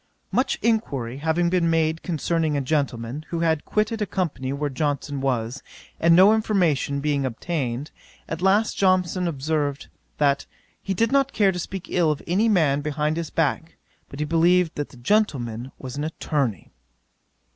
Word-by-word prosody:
'Much 255 +2 +1
enquiry 140 - 0
having 165 +3 +1
been 175 -2 +2
made 160 0 +1
concerning 160 -2 0
a - - 0
gentleman, 135 -2 -2
who 170 -1 -2
had 160 -2 +1
quitted 215 +1 0
a 210 - 0
company 155 -8 -2
where 145 +1 -2
Johnson 145 0 -2
was, 125 -1 -1 0.4
and 165 0 +5
no 190 +4 +7
information 175 - +1
being 145 -1 0
obtained; 130 +1 -3 0.4
at 165 +1 -5
last 200 +4 +3
Johnson 185 -1 +2
observed, 145 -2 -2 0.3
that 140 -2 +1 0.3
"he 195 - -3
did 230 +4 +1
not 275 -1 +2
care 200 -3 +3
to 180 - -5
speak 185 +1 -5
ill 170 -3 +2
of 150 - -4
any 200 +7 +2
man 155 -8 +3
behind 150 +1 -1
his 165 -1 -3
back, 165 +1 -1 0.3
but 140 - -9
he 150 - 0
believed 170 +2 +3
the 145 - -3
gentleman 125 - -1
was 130 0 -7
an 145 - -2
attorney." 145 - -2
160 Hz, 160 wpm, -24 LUFS, 140-180 Hz, 0.4 s, no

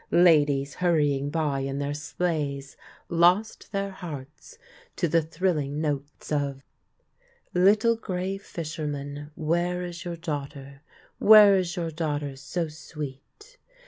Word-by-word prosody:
Ladies 145 -5 +4
hurrying 145 -6 +1
by 150 -3 0
in 135 0 -3
their 140 0 -2
sleighs 145 -2 -3 0.3
lost 175 +6 +2
their 200 -1 -2
hearts 155 - -9 0.4
to 175 - 0
the 165 +1 +3
thrilling 155 -3 -1
notes 145 -2 -4
of: 140 -2 -1 0.5
" 485 -1 -37
Little 210 +6 +4
grey 190 -2 -3
fisherman, 145 -5 -5
Where 175 +3 0
is 175 -1 -6
your 175 -2 -5
daughter? 140 -4 -6 0.4
Where 210 -2 +9
is 180 -2 0
your 170 -3 -2
daughter 150 -3 -2
so 150 +5 -3
sweet 155 - -10
160 Hz, 120 wpm, -26 LUFS, 145-180 Hz, 0.5 s, Where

